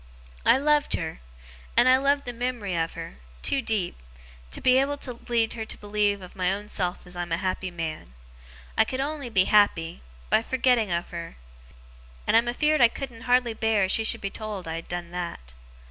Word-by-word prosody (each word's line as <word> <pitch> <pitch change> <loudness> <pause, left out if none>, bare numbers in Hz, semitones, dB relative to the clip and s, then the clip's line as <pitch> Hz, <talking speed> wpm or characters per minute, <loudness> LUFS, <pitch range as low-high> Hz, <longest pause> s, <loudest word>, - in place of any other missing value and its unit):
'I - - +8
loved 295 +1 +2
her - - -4 0.6
and 250 - +6
I 255 0 +7
love 280 +1 +2
the 245 - -5
mem'ry 240 -6 -2
of 165 -1 -1
her 65 - -8 0.2
too 275 - +3
deep 215 -6 -1 0.5
to - - -5
be 255 0 +5
able 285 +1 0
to 250 -4 -5
lead 230 -2 +2
her 225 - -4
to 220 - -7
believe 205 -1 0
of 180 - -12
my 185 -1 +1
own 205 +2 -4
self 180 -2 -2
as 180 0 -10
I'm 175 -1 -4
a 165 - +2
happy 185 0 -2
man. 160 - -6 0.6
I - - +5
could 260 - -4
only 285 -2 -3
be 190 -5 +4
happy 185 -5 +3 0.3
by - - +5
forgetting 245 -4 +2
of 170 0 -1
her 170 -1 -6 0.9
and - - +2
I'm 230 +1 +5
afeerd 300 +4 +2
I 240 - +9
couldn't 245 0 -7
hardly 250 -2 +3
bear 220 -2 +2
as 190 - +1
she 225 - +3
should - - +2
be 200 - -3
told 210 -5 -6
I 165 +1 -3
done 175 0 -6
that. 170 - -6
215 Hz, 200 wpm, -26 LUFS, 180-250 Hz, 0.9 s, I